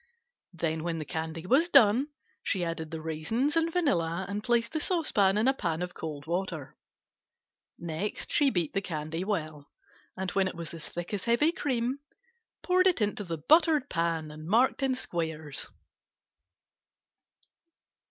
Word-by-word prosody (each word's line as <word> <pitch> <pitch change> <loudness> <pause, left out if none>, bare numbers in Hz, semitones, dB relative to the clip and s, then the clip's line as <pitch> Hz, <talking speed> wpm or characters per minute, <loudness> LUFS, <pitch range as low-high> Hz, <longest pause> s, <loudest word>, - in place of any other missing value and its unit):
Then 160 -1 -2
when 170 -1 -2
the 155 - -4
candy 160 +2 -4
was 290 - +3
done 260 -2 +6 0.3
she 185 -4 0
added 165 -1 -4
the 160 0 -6
raisins 220 - -1
and 330 0 +2
vanilla 185 - +1
and 205 +1 -4
placed 235 -1 +1
the 315 - 0
saucepan 240 - +2
in 220 +4 +2
a 265 - +5
pan 170 -8 -2
of 180 0 -5
cold 150 -3 -6
water. 170 -4 -3 1.0
Next 170 +4 -3
she 290 -2 +4
beat 175 - -1
the 195 - 0
candy 160 -1 -4
well, 155 -8 -3 0.5
and 190 -1 -2
when 195 -1 +2
it 185 - -5
was 170 -1 -6
as 165 -2 -8
thick 175 +3 -6
as 200 - -2
heavy 240 +7 +3
cream, 260 -5 -1 0.6
poured 370 +1 +4
it 360 - +3
into 210 -1 0
the 170 -3 -4
buttered 305 - +4
pan 165 -2 -1
and 155 +1 -9
marked 240 +8 +3
in 265 -1 +2
squares. 160 - -4
185 Hz, 155 wpm, -29 LUFS, 160-255 Hz, 1.0 s, done